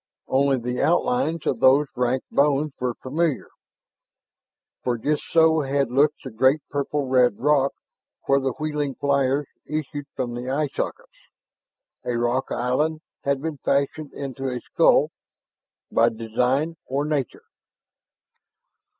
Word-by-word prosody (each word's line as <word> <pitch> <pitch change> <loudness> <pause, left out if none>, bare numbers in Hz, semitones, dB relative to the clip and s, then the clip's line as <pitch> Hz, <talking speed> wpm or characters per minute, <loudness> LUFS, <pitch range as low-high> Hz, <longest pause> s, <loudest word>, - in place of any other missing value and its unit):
Only 135 0 +2
the 125 +1 -3
outlines 175 -2 +1
of 120 - 0
those 135 +4 +5
ranked 125 +1 -1
bones 145 +1 +2
were 125 -2 -1
familiar; 150 +1 -1 1.3
for 120 -1 0
just 150 +6 0
so 160 -1 +4
had 140 -2 0
looked 145 +3 +2
the 130 - -7
great 130 +7 +3
purple 145 0 -1
red 125 -4 +3
rock 140 0 +3 0.5
where 140 0 +3
the 135 -2 -1
wheeling 150 -2 -2
flyers 140 0 +1 0.2
issued 145 -1 -4
from 120 -2 -3
the 120 +1 -5
eye 145 +2 0
sockets. - - -6 0.7
A 120 -1 -1
rock 120 +2 0
island 150 +6 0 0.2
had 140 0 0
been 160 -2 -3
fashioned 140 +3 -1
into 135 -1 -4
a 125 -1 -3
skull - - +3 0.8
by 115 +1 +4
design 125 +8 -1
or 140 +3 -1
nature? 145 -5 -2
140 Hz, 130 wpm, -24 LUFS, 125-150 Hz, 1.3 s, those